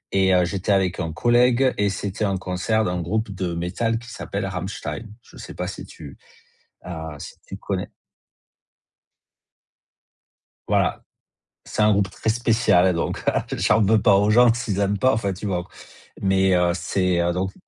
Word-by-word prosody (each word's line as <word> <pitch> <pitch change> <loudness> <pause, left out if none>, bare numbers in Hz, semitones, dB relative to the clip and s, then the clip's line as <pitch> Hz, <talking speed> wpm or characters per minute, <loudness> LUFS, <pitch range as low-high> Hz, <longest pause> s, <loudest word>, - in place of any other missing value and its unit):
et 95 -1 +3
heu, 90 -1 +3
j'étais 95 +2 -2
avec 95 -2 +1
un 80 -3 -2
collègue 120 +6 +3
et 100 0 +2
c'était 100 +2 -4
un 100 -2 0
concert 95 +4 -1
d'un 90 -3 -2
groupe 110 +4 -2
de 90 -3 -3
métal 100 +7 -1
qui 120 +1 -11
s'appelle 100 0 -4
Rammstein, 95 +4 -5 0.2
je - - -17
sais - - -9
pas - - -3
si - - -7
tu, 70 -3 -12 0.7
heu, 90 - -5 0.2
si - - -9
tu - - -8
connais? - - -4 2.8
Voilà, - - +1 0.6
c'est - - -2
un 105 0 +5
groupe 100 -1 +1
très 110 - -2
spécial, 110 -6 +3
donc 85 - -2
heu, - - -1
j'en 110 - +3
veux 110 +2 +3
pas 100 - +5
aux 105 +2 +3
gens 120 +1 +6
s'ils 110 -5 -3
aiment 100 0 +1
pas, 130 +6 +3
enfin, 105 -3 -1
tu 100 +3 -7
vois 90 -3 -1
qu - - -21 0.5
mais 95 -1 +3
heu, 90 -1 +2
c'est 90 +1 0 0.2
donc 95 +1 -2
100 Hz, 170 wpm, -23 LUFS, 90-110 Hz, 2.8 s, gens